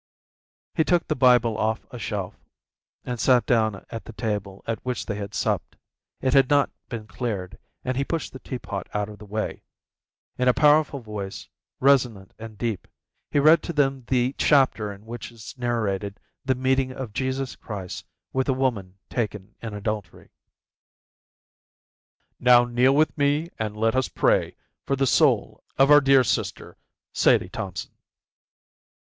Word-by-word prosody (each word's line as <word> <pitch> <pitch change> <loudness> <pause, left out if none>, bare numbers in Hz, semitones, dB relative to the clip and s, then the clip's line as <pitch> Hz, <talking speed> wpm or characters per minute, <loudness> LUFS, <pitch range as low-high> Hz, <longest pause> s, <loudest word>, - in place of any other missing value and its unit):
He 160 - +2
took 175 +1 +1
the 155 - 0
Bible 120 -4 +4
off 110 +1 -1
a 125 - -8
shelf, 100 -4 -3 0.7
and 125 -1 -4
sat 125 +1 +4
down 110 -4 +1
at 115 -1 -6
the 115 - -10
table 105 -3 -4
at 115 -1 -3
which 125 -1 -3
they 105 - -3
had 100 0 -6
supped. - - -1 0.5
It 130 -1 +1
had 135 -2 +5
not 145 -1 +3 0.2
been 115 -3 -5
cleared, 100 -3 -4 0.3
and 130 - -1
he 135 - +1
pushed 165 +2 -3
the 130 - -8
tea 130 - -5
pot 100 -5 -6
out 105 0 -1
of 105 -2 -11
the 105 - -12
way. 110 +2 -3 0.8
In 125 - +2
a 125 - +5
powerful 150 -2 +4
voice, 105 -3 -6 0.3
resonant 125 -8 +2
and 110 -1 -9
deep, 115 -4 -3 0.4
he - - -1
read 155 +3 +6
to 170 - -5
them 135 -3 +1
the 125 0 +1
chapter 130 -7 +3
in 100 +1 -12
which 120 +1 -7
is 115 -3 -11
narrated 105 -5 -2 0.2
the 130 -1 +1
meeting 130 +1 +1
of 130 -5 -7
Jesus 130 +2 -2
Christ 95 -5 -7 0.3
with 130 0 0
the 135 - +2
woman 105 -8 -1
taken 105 -3 -4
in 110 -3 -6
adultery. 105 -3 -5 2.1
"Now 125 -1 +6
kneel 125 +3 +3
with 155 -1 +3
me 145 +3 +1
and 105 -1 -3
let 115 +2 +1
us 130 -1 +1
pray - - +1 0.3
for 140 - 0
the 135 0 +1
soul 125 - +2
of 135 +2 +5
our 150 0 +9
dear 135 -1 +5
sister, 115 - -2 0.4
Sadie 90 - +3
Thompson." 95 -4 -6
120 Hz, 160 wpm, -25 LUFS, 105-130 Hz, 2.1 s, our